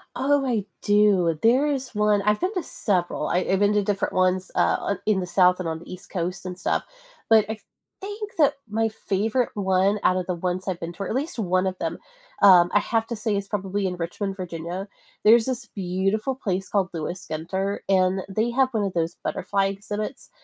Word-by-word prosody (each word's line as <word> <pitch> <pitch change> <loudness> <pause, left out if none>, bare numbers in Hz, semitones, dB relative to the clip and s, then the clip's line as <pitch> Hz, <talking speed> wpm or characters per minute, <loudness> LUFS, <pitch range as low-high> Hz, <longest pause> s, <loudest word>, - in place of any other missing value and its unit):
Oh, 280 0 +2
I 225 -6 0 0.2
do. 200 -6 +3
There 255 +6 +4
is 270 -4 -2
one 210 -1 +2
I've 210 0 +2
been 370 +3 -1
to 360 - -1
several. 185 - -1
I 180 - +2
I've 190 +1 0
been 205 0 +3
to 205 -1 +2
different 200 0 -1
ones, 185 0 +1
uh, - - +3
o 200 - -1
in 210 -3 +2
the 180 - -3
South 180 0 +4
and 170 -3 -2
on 160 - -4
the 170 - -12
East 185 0 -10
Coast 180 0 -3
and 180 0 -5
stuff, - - 0 0.5
but 220 -2 +6
I 220 - -3 0.4
think 415 +1 -6
that 295 -3 +4 0.2
my 225 +1 +1
favorite 220 +4 -1
one, 195 +1 +2
out 185 - +4
of 185 - -2
the 180 - -1
ones 180 +1 -2
I've 180 -2 -2
been 170 +1 -5
to 195 - -5
or - - -4
at - - -2
least 290 +1 -2
one 185 -2 +1
of 185 - -3
them, - - -3 0.4
um, 180 -3 +7
I 205 - +6
have 225 +1 0
to 235 - -3
say 215 -1 -1
is 200 0 -3
probably 195 -1 -2
in 180 -1 -2
Richmond, 195 +3 -3
Virginia. 175 +2 -5 0.4
There's 225 +1 +6
this 255 -2 -3
beautiful 195 +6 -1
place 190 -7 -3
called 195 -3 +1
Lewis 175 +3 -5
Ginter, 190 +6 -2
and 190 0 +2
they 220 +4 0
have 260 +1 +3
one 215 -3 0
of 190 - -3
those 165 0 -1
butterfly 195 -1 0
exhibits 205 +5 -5
195 Hz, 215 wpm, -24 LUFS, 185-220 Hz, 0.5 s, um